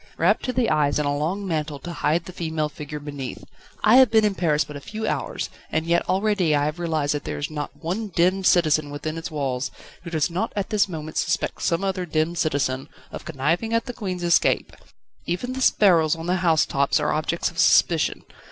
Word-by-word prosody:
Wrapped - - +3
to 255 - 0
the 250 -5 +1
eyes 145 -2 +2
in 150 - 0
a 145 0 0
long 180 +7 -2
mantle 155 -3 -2
to 175 +4 -7
hide 160 +2 0
the 185 - -9
female 160 -3 -2
figure 150 +1 -7
beneath. 145 -3 -7 0.4
I 220 +4 +6
have 260 -3 +7
been 220 -1 +4
in 210 - +2
Paris 155 -5 +1
but 150 - -10
a 145 - -7
few 220 +8 -5
hours, - - -3 0.2
and 160 0 0
yet 170 +1 +1
already 190 -4 +2
I 145 0 +2
have 155 +3 -3
realised 155 -4 0
that 145 - -3
there - - -4
is 145 +1 -4
not 150 -1 -4
one 195 +7 -2
demmed 185 +2 +2
citizen 155 -4 +3
within 150 +2 -5
its 165 0 -5
walls, 140 -3 -2 0.3
who 170 - -8
does 160 0 0
not 190 +7 -2
at 200 +1 -3
this 205 -2 +2
moment 155 -2 -6
suspect - - -1
some 170 +3 0
other 190 -2 -2
demmed 155 +2 0
citizen 135 -3 -1 0.2
of - - -8
conniving 170 +9 -1
at 230 - +1
the 245 - -5
Queen's 185 -6 -4
escape. 170 -1 +2 0.5
Even 215 +9 -2
the 265 - -4
sparrows 170 -10 +4
on 165 0 -7
the 180 +2 +1
house 165 -3 +3
tops 140 +2 +1
are 150 - 0
objects 155 +3 -1
of 170 - -8
suspicion. 165 -4 +3
165 Hz, 215 wpm, -23 LUFS, 150-185 Hz, 0.5 s, have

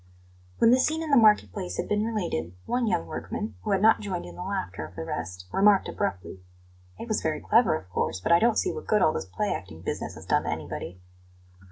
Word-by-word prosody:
When 230 - +5
the 255 - +5
scene 315 +5 +1
in 310 - -4
the - - +6
market 210 - +5
place 90 +1 -5
had - - -2
been 210 0 +1
related, 170 - -2
one 245 -1 0
young 85 - 0
workman, 105 +5 -5
who - - -5
had 195 0 +2
not 220 - +6
joined 190 -4 -4
in - - -10
the - - -8
laughter 185 - -4
of 80 +3 -10
the 80 - -5
rest, 90 +3 -5
remarked 200 0 +4
abruptly: 95 0 -4 0.6
"It - - -7
was 215 - 0
very 155 -1 -1
clever, 225 -5 +3
of 95 - -7
course; 95 - -1
but 90 - -2
I 170 - +7
don't 230 +1 +3
see 370 - +1
what 460 - -8
good 210 -2 +3
all 155 - +4
this - - -3
play 205 - -1
acting 80 -3 -8
business - - -4
has - - -11
done - - +1
to - - -2
anybody." 90 - -5
190 Hz, 235 wpm, -27 LUFS, -, 0.6 s, I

